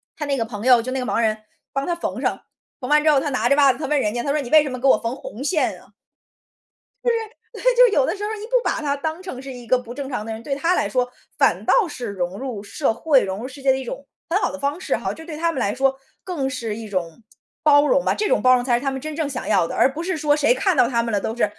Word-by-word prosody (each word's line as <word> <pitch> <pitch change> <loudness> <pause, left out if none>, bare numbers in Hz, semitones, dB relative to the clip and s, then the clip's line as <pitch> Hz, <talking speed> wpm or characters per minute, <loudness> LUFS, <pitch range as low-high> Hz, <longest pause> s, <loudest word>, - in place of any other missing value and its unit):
她 300 - -4
那 280 -1 0
个 230 - 0
朋 215 -2 -7
友， 250 -2 +6
就 255 +3 -5
那 265 - -1
个 250 - -3
盲 205 - 0
人， 220 -1 +2 0.4
帮 275 0 -2
她 345 - 0
缝 340 - -4
上， - - -1 0.4
缝 250 -3 -6
完 300 0 +4
之 310 - +4
后 285 - +4
她 290 - -2
拿 240 -3 0
着 280 - +5
袜 280 -2 +5
子， 260 - -12
她 - - -3
问 295 +1 +2
人 210 -5 0
家， 240 - -2
她 280 - -1
说： 300 - +1
“你 250 - -7
为 310 - +8
什 290 - -4
么 255 -1 -5
给 270 - +1
我 - - +6
缝 230 +2 -3
红 265 -2 -8
线 310 +2 0
啊？” - - -20 1.2
就 485 - +3
是 465 - +2 0.4
对， - - -9
就 - - +8
是 - - +1
有 - - +3
的 - - -1
时 410 - -5
候 420 - -2
你 425 0 -8
不 475 - -19
把 - - 0
她 285 -2 -1
当 315 +4 -4
成 365 -9 -7
是 270 0 -8
一 245 -1 -10
个 255 - +3
不 245 -1 -9
正 280 -1 -5
常 245 -6 -3
的 225 - -4
人， 220 +1 -7
对 275 +3 -2
她 330 +6 +1
来 205 - 0
说， 250 +3 0 0.3
反 - - +2
倒 460 -8 +3
是 250 -5 -6
融 190 -2 -3
入 245 -6 -5
社 225 +5 -1
会、 280 0 +3
融 190 +1 -4
入 250 - -5
世 275 +1 -12
界 270 - +3
的 265 - +2
一 265 - -5
种 270 +3 -7 0.2
很 345 +3 +2
好 - - 0
的 285 - -6
方 285 +4 -2
式 - - 0
哈。 - - -3
这 320 - -11
对 320 -2 -7
她 335 +2 0
们 265 - -3
来 205 -3 0
说， 265 +1 +1 0.3
更 315 -8 -2
是 235 -5 -4
一 225 -1 -7
种 185 +1 -4 0.4
包 290 -1 +5
容 - - +2
吧。 - - +2
这 420 - -1
种 - - +2
包 255 0 +6
容 250 - +2
才 245 -1 +2
是 - - -8
她 275 - +1
们 265 0 -5
真 310 +2 -6
正 315 -3 -1
想 265 -3 -5
要 165 - +3
的， - - -6
而 - - +4
不 315 +4 -5
是 365 0 -2
说 295 -1 +2
谁 295 +9 +3
看 380 -7 +1
到 250 - +5
她 235 -2 +1
们 230 - -3
了 205 - +1
都 220 - -3
是 240 - +1
270 Hz, 345 characters per minute, -22 LUFS, 240-305 Hz, 1.2 s, 为